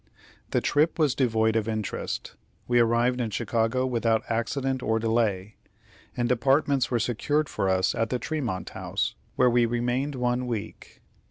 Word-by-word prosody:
The - - +1
trip 150 +3 +2
was 150 -5 +3
devoid 110 -4 +1
of 110 -1 0
interest. 110 -2 -4 0.3
We 120 0 +3
arrived 120 +2 +2
in 115 - -1
Chicago 115 +3 0
without 115 -3 +1
accident 130 +3 -1
or 110 -1 +1
delay, 110 -3 0 0.6
and 120 0 +1
apartments 135 +2 +2
were 120 - +1
secured 140 +6 0
for 95 - -1
us 95 0 +2
at 115 -1 -1
the 125 - 0
Tremont 125 -10 -3
House, - - -2 0.2
where 125 - +4
we 120 -1 +3
remained 120 +4 -1
one 125 0 -1
week. 115 -4 -6
120 Hz, 155 wpm, -26 LUFS, 110-130 Hz, 0.6 s, where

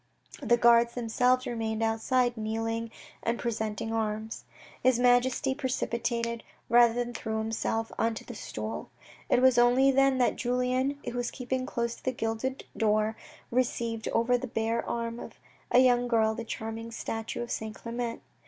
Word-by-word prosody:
The 240 -3 +3
guards 235 0 +5
themselves 250 +2 +2
remained 225 -2 -2
outside 240 +2 +1
kneeling 225 +1 -2 0.3
and 230 +1 -1
presenting 225 -1 -3
arms. 220 0 -3 0.4
His 255 -2 +4
Majesty 245 +2 +3
precipitated, 235 -3 -2 0.3
rather 235 0 +6
than 240 0 -2
threw 220 -2 -3
himself, 225 0 -2
on 225 0 +1
to - - -8
the 240 - -8
stool. 110 - -6 0.4
It 250 - +3
was 260 -2 +6
only 250 +3 +5
then 270 0 +4
that 250 - +2
Julien, 250 +3 0
who - - -3
was 245 -1 -1
keeping 255 0 -3
close 235 0 -1
to - - -19
the 260 - +1
gilded 225 +3 -3
door, 215 0 +1 0.4
perceived 235 -2 -1
over 240 +2 +2
the 260 - -5
bare 225 0 -1
arm 230 0 -3
of - - -8 0.4
a - - +4
young 245 -1 +5
girl, 220 -2 +3
the 230 +1 -6
charming 225 +1 -5
statue 225 0 -4
of 240 - -7
St. 220 0 -4
Clement. 235 0 -4
235 Hz, 160 wpm, -29 LUFS, 225-245 Hz, 0.4 s, rather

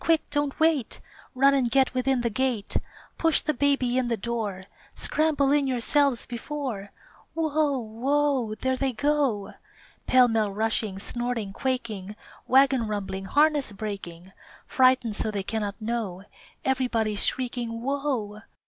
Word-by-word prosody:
Quick! 325 -1 +2
don't 290 -1 -1
wait! 315 -6 +1 0.4
Run 275 +2 +5
and 260 -3 +2
get 265 +2 +3
within 255 0 +1
the 235 -1 -1
gate! 240 -2 -1 0.4
Push 325 -2 +3
the 305 - 0
baby 260 -2 +1
in 250 - 0
the 230 -1 0
door, 215 -4 -3 0.3
Scramble 300 -3 +1
in 290 -1 +3
yourselves 265 +1 +2
before 240 -5 -5 0.4
Whoa! 310 -3 +1
Whoa! 255 +1 0
There 260 +4 -1
they 265 0 -1
go! 275 -6 0 0.5
Pell 255 -1 +6
mell 220 -3 +1
rushing, 215 -1 -1
snorting, 235 -1 -3
quaking, 220 -6 -3 0.3
Wagon 265 -3 +4
rumbling, 195 -2 -4
harness 290 +1 +2
breaking, 195 -4 -7 0.3
Frightened 255 -4 +3
so 220 - -1
they 205 -2 -3
cannot 210 0 -3
know 215 -5 -3 0.4
Everybody's 235 -6 0
shrieking 245 -2 -2
"_Whoa! 235 -3 -3
245 Hz, 130 wpm, -26 LUFS, 215-275 Hz, 0.5 s, Pell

